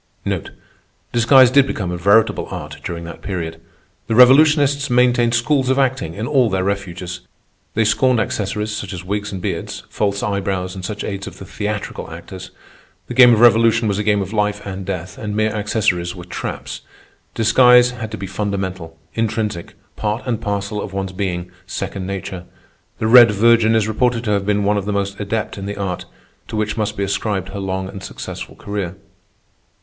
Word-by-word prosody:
Disguise 125 +2 +6
did 140 0 +5
become 95 -8 -3
a - - -2
veritable 100 +5 +3
art - - -7
during 85 -1 -5
that 85 - -9
period. 80 -4 -5 0.5
The 115 - 0
revolutionists 140 +2 +5
maintained 120 -1 +3
schools 130 +2 +1
of 130 - +2
acting 130 - 0
in 105 +3 -3
all 130 -3 +3
their 95 -2 0
refuges. 90 -2 -3 0.6
They 110 0 +2
scorned 125 +3 +3
accessories, 105 0 -2
such 100 -2 -5
as 90 -1 -6
wigs 100 +2 -3
and 95 - -5
beards, - - -4
false 100 -1 -1
eyebrows, 95 -2 -2
and 95 -1 -8
such 105 +2 -4
aids 100 -1 -4
of - - -9
the 95 - -9
theatrical 105 +2 -4
actors. 95 -1 -9 0.6
The - - -6
game 125 -2 +8
of 115 -1 +3
revolution 115 -1 +5
was 100 -1 0
a - - 0
game 105 -1 +2
of 95 +3 -8
life 105 -1 -1
and 95 -1 -6
death, 90 -1 -5
and 105 -1 -4
mere 110 0 +1
accessories 105 -5 0
were 90 -2 -9
traps. 90 - -6 0.5
Disguise 125 +2 +6
had 115 -3 -6
to 110 - -6
be 100 - -5
fundamental, 95 -4 -4 0.2
intrinsic, 110 -5 -2 0.2
part 105 +2 -2
and 115 -3 -2
parcel 100 0 -2
of 95 - -7
one's 95 -1 -3
being, 90 -2 -3 0.2
second 95 -1 -4
nature. 95 -2 -5 0.5
The - - -2
Red 120 +1 +8
Virgin 115 +1 +4
is 110 -1 +2
reported 120 +2 +1
to 105 - -1
have 100 -1 0
been 105 0 +1
one 105 +1 +2
of 100 - -2
the 105 - -2
most 100 0 -2
adept 105 0 -3
in 100 - -5
the 100 - -5
art, 95 -3 -3 0.4
to - - -6
which 110 0 -1
must 110 -2 -2
be 100 - -1
ascribed 100 -1 -2
her 100 +1 -6
long 95 -1 -3
and 95 0 -8
successful - - -7
career. 100 -3 -4
105 Hz, 185 wpm, -19 LUFS, 95-115 Hz, 0.6 s, game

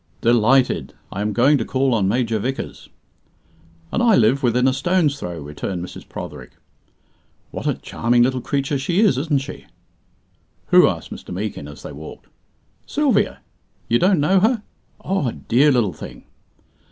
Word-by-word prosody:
"Delighted! 120 +3 +2 0.2
I 100 - -4
am 105 +1 -1
going 135 +6 +3
to - - 0
call 130 +2 0
on 105 -4 +1
Major 115 +1 0
Vickers." 130 +5 -5 1.0
"And - - 0
I 235 -3 +5
live 125 +5 +3
within 125 0 +2
a 130 - +3
stone's 165 -2 +1
throw," 85 -2 -5
returned 75 +5 -5
Mrs. - - -12
Protherick. - - -8 1.0
"What - - -5
a - - +1
charming 120 +1 +1
little 130 0 0
creature 140 +1 -1
she 175 +8 +1
is, 200 - +3
isn't 145 -2 0
she?" 140 - -9 1.0
"Who?" - - +7
asked - - -4
Mr. - - -9
Meekin, 95 -5 -4
as 75 0 -12
they - - -7
walked. 75 +2 -10 0.6
"Sylvia. - - +1 0.5
You 120 - +3
don't 185 -2 +3
know 185 +7 +3
her! 220 +2 +2 0.4
Oh, 190 -8 0
a 115 - -2
dear 140 +6 +2
little 115 - +1
thing." 75 - -10
125 Hz, 160 wpm, -21 LUFS, 110-145 Hz, 1.0 s, Who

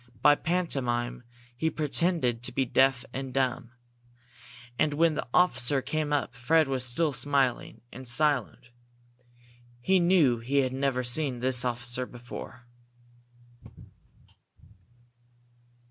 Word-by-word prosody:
By 145 - +7
pantomime 125 -8 -2 0.3
he 160 +6 0
pretended 155 -5 -1
to 125 - -3
be 135 +2 0
deaf 130 0 +2
and 135 0 -5
dumb. 130 -2 -1 1.1
And 150 -1 +1
when 165 +1 +3
the - - -4
officer 135 -5 +2
came 155 -1 -2
up, 140 -4 -1
Fred 155 +6 +2
was 130 -2 0
still 145 +5 +1
smiling 135 0 0
and 130 +1 -9
silent. 125 -2 0 1.1
He 190 +9 +2
knew 170 -9 +3
he 135 +4 +1
had 130 -1 -2
never 135 -1 -1
seen 125 0 0
this 125 0 +1
officer 125 0 -3
before. 120 0 -10
130 Hz, 115 wpm, -27 LUFS, 125-150 Hz, 1.1 s, By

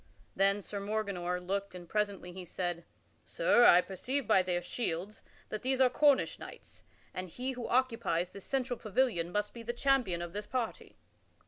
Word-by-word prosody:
Then 195 +1 +3
Sir 200 - -5
Morganor 200 -4 -2
looked 195 +2 -3
and 175 -1 -9
presently 200 -2 -2
he 185 +1 -8
said: 175 -1 -4 0.4
"Sir, - - +4
I 175 - +8
perceive 250 +9 -2
by 190 - +5
their 180 -1 0
shields 190 0 -3 0.3
that 215 - -4
these 260 +1 0
are 255 -2 +5
Cornish 285 +1 +3
knights, - - -11 0.3
and 185 0 -5
he 255 +9 -3
who 245 -2 -5
occupies 230 -9 +1
this 200 - -10
central 255 -3 -1
pavilion 215 -7 +1
must 210 +1 -1
be 235 - -8
the 235 +1 -3
champion 240 -9 +1
of 175 0 -7
this 205 0 -5
party." 245 -4 -4
205 Hz, 175 wpm, -32 LUFS, 180-245 Hz, 0.4 s, I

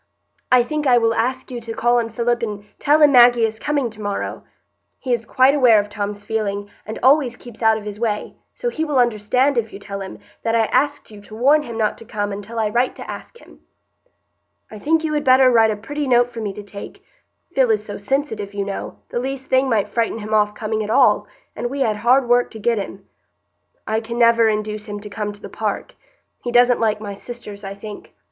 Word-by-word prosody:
I 250 -1 +6
think 300 +3 -2
I 245 -2 +6
will 230 -1 +2
ask 255 +4 -2
you 240 -1 -5
to 225 0 -6
call 240 +1 +2
on 230 -1 -2
Philip 235 +1 0
and 210 -3 -4
tell 300 +2 +4
him 290 - +7
Maggie 240 -2 +6
is 220 0 -4
coming 285 -5 -1
to 215 0 -12
morrow. 205 -1 -4 0.5
He 255 -2 -2
is 230 -2 -2
quite 260 +2 +4
aware 250 -7 +5
of 205 0 -3
Tom's 205 0 -4
feeling, 205 -2 -3 0.2
and 220 - -5
always 265 -2 +4
keeps 240 -2 -13
out 220 -1 +4
of 215 - -8
his 210 0 -7
way; 215 -3 -2 0.2
so 485 - -2
he 320 -9 -3
will 300 -3 -1
understand, 245 +3 +2
if 225 -1 -4
you - - -8
tell 200 0 -7
him, 190 - -7 0.2
that 230 0 0
I 225 -1 +3
asked 285 +2 0
you 210 -1 -12
to 215 +1 -12
warn 280 +7 +4
him 235 -6 -7
not 215 -2 0
to 230 - -12
come 205 -2 -3
until 205 +3 -7
I 220 -1 +1
write 245 +3 +1
to - - -9
ask - - -8
him." - - -18 1.1
"I 215 - -9
think 320 +6 +1
you 310 -1 -1
had 295 -1 0
better 260 -1 +6
write 225 -2 +5
a 215 - 0
pretty 285 +7 -4
note 245 -1 +3
for 230 -1 -6
me 210 -2 -2
to 205 - -8
take; 200 0 -10 0.5
Phil 260 -3 +3
is 215 -1 +1
so 205 - -6
sensitive, 215 -4 -2
you 200 -1 -2
know, 200 -1 -5
the - - -2
least 265 +1 -5
thing 260 +1 +3
might 220 -4 +1
frighten 230 -1 -1
him 215 0 -5
off 210 -1 +2
coming 220 0 -2
at 210 - -6
all, - - +4 0.3
and 240 - -3
we 275 +2 -4
had 220 -5 +1
hard 245 +4 +3
work 245 0 +3
to 220 - -10
get 230 +1 +1
him. 195 0 -7 0.8
I 220 0 0
can 230 +1 -6
never 230 -1 +5
induce 210 0 -3
him 205 0 -5
to 210 0 -9
come 210 -1 -3
to 205 - -14
the - - -7
park; - - -4 0.5
he 240 - -4
doesn't 245 0 +4
like 215 -1 +1
my 205 -2 -5
sisters, 210 -1 -9
I 195 0 -6
think. 205 +1 -10
230 Hz, 235 wpm, -20 LUFS, 210-250 Hz, 1.1 s, him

